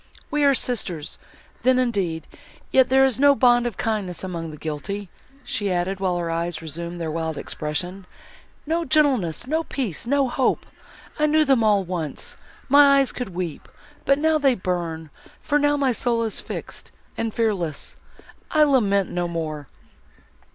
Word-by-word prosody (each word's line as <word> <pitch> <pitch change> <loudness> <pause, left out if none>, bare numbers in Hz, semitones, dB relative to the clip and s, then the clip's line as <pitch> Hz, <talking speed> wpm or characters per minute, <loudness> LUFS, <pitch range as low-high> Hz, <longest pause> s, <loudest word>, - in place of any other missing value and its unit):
We 295 -1 +1
are 280 -1 +5
sisters, 180 -12 -1 0.4
then 255 0 +4
indeed. 195 -11 -1 0.5
Yet, 260 -1 +5
there 265 +1 +5
is 260 -3 0
no 285 0 +6
bond 240 -2 +4
of 230 - -6
kindness 200 -6 -2
among 170 -3 -4
the 155 - -9
guilty," 165 +6 -5 0.3
she 205 -5 -2
added, 180 +2 -1
while 185 -2 0
her 170 -1 -2
eyes 170 0 -2
resumed 170 +2 -5
their 165 -2 -3
wild 160 -1 -3
expression, 180 +5 -4 0.6
"no 330 +3 0
gentleness,—no 275 - +1
peace, 235 - -4
no 280 +1 +2
hope! 255 +1 0 0.5
I 300 - +3
knew 310 +1 +4
them 265 -5 +3
all 205 -2 +3
once—my 220 - +1
eyes 275 -2 +2
could 220 -9 -6
weep—but 275 - -3
now 315 +1 +2
they 270 -3 +3
burn, 170 -5 -3 0.3
for 295 -1 +1
now, 290 0 +2
my 275 -2 +2
soul 235 -1 0
is 220 - -3
fixed, - - -8 0.2
and 225 -1 -2
fearless!—I 210 - -2
lament 205 -10 +2
no 175 0 -1
more!" 155 -4 -4
205 Hz, 150 wpm, -23 LUFS, 170-270 Hz, 0.6 s, no